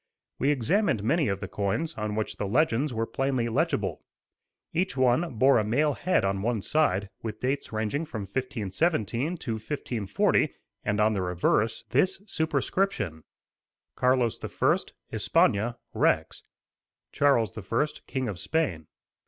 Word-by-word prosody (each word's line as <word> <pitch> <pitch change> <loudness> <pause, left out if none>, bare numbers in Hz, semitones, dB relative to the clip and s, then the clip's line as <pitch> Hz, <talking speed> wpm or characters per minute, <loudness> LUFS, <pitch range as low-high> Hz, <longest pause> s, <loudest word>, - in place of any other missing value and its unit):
We 140 - +2
examined 145 - +1
many 150 +5 +2
of 100 0 -1
the 95 - -4
coins, 105 - -1
on 105 -1 -3
which 110 0 -3
the 100 - -2
legends 135 +3 +2
were 115 -1 -1
plainly 130 -1 -1
legible. 110 - 0 0.7
Each 180 -4 0
one 130 +4 +2
bore 130 +2 +5
a - - +1
male 145 +8 +2
head 180 - +1
on 95 0 0
one 110 -2 -1
side, 100 -11 +1
with 110 -2 -5
dates 135 +3 -2
ranging 110 +8 -1
from 115 -9 -5
1517 125 - -1
to 120 - -5
1540; 110 -3 0 0.3
and 105 0 0
on 110 +1 +4
the 100 - -1
reverse, 90 +5 +1
this 185 +9 +2
superscription: 160 - -1 0.7
"Carlos 125 -2 +2
I., - - +2 0.4
Espana: 115 +4 +2 0.2
Rex" 80 0 +1 0.7
Charles 135 -7 +2
I., 115 +6 0 0.2
King 130 -2 -2
of 100 -5 -4
Spain. 85 - -1
120 Hz, 135 wpm, -27 LUFS, 105-145 Hz, 0.7 s, bore